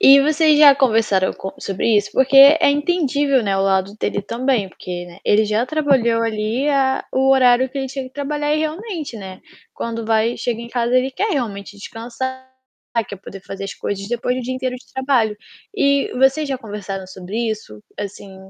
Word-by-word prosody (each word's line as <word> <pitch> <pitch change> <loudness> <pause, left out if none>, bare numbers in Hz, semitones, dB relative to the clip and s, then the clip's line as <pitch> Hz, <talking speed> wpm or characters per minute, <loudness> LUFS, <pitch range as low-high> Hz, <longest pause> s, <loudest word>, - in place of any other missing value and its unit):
E 275 +1 +8
vocês 305 +1 +3
já 290 -2 +8
conversaram 220 -8 +2
com 190 - -7
sobre 205 +3 0
isso? 205 0 0
Porque 265 +1 +2
é 280 +3 +8
entendível, 290 -3 +1
né, 195 -2 0
o - - 0
lado 195 0 +1
dele 205 - -1
também 235 -1 -1
porque, 175 -1 -7
né, 175 +1 -14
ele 215 +1 +3
já 215 +3 0
trabalhou 260 -6 +1
ali 225 +5 -1
a 270 -2 +1
o 265 +1 +2
horário 260 -1 +4
que 275 +2 -6
ele 270 - -2
tinha 270 0 -5
que 255 - -11
trabalhar 295 +1 -2
e - - 0
realmente, 315 - -4
né, 190 -3 -9 0.3
quando 230 -1 -4
vai 225 +1 +1
chega 235 -2 -3
em 235 - -8
casa, 240 0 0
ele 255 +1 +1
quer 415 +11 -2
realmente 205 - -4
descansar, 245 +5 -6 0.6
quer 200 - -7
poder 195 0 -11
fazer 195 - -8
as 195 - -6
coisas 200 0 -5
depois 240 +1 -1
de 255 - -2
um - - -7
dia 255 +1 -3
inteiro 255 -1 -3
de 250 - -18
trabalho. 260 -5 +1 0.4
E 280 -7 +2
vocês 270 +3 +2
já 265 - -2
conversaram 200 -4 -6
sobre 185 +2 -8
isso? 110 - -7 0.2
Assim, 200 -1 -7
245 Hz, 195 wpm, -19 LUFS, 205-275 Hz, 0.6 s, E